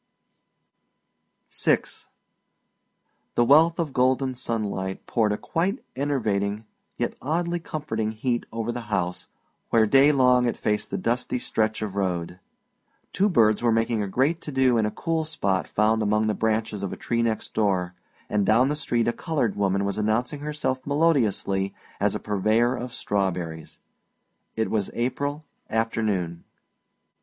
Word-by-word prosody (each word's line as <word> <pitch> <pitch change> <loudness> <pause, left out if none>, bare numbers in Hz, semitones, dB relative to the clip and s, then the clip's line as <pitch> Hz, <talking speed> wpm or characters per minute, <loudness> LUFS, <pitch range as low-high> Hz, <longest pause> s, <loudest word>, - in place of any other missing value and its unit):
VI - - +2 1.5
The 120 - +4
wealth 160 +5 +5
of 160 -5 -2
golden 130 +1 +2
sunlight 105 -6 -3
poured 110 -3 +1
a 105 - 0
quite 190 +9 -2
enervating 110 -7 -1 0.3
yet - - -1
oddly 170 +4 -1
comforting 145 -10 -3
heat 120 +2 -2
over 115 +1 -2
the 120 - -4
house 90 -3 -2 0.4
where 110 -1 +4
day 135 +6 +6
long 125 -3 +4
it 120 - -1
faced 105 -1 -1
the - - -2
dusty 125 +2 -1
stretch 110 -2 -1
of 105 -3 -4
road. 90 -2 -2 0.7
Two 200 +2 +3
birds 110 - +4
were 120 -1 +3
making 115 0 +1
a 100 - -2
great 135 - +1
to 150 - -6
do 130 -2 +3
in 110 - +2
a - - 0
cool 165 +7 -1
spot 100 - -1
found 110 +1 +2
among 105 +1 +2
the 110 - +1
branches 110 -2 -1
of 100 - -3
a - - -6
tree 115 -1 -1
next 115 -2 -2
door, 95 -5 +1 0.3
and 105 -1 +1
down 125 +7 +4
the 150 - 0
street 120 -6 0
a 120 - +2
colored 140 -9 -1
woman 100 0 +1
was 100 +1 -2
announcing 120 +8 0
herself 145 -3 -2
melodiously 125 - +1 0.2
as - - +1
a - - -2
purveyor 110 +5 +1
of 125 0 -5
strawberries. 90 -7 -3 0.8
It 110 - 0
was 105 -3 0
April 145 +5 -2 0.2
afternoon. 105 -7 -1
115 Hz, 150 wpm, -25 LUFS, 105-135 Hz, 1.5 s, day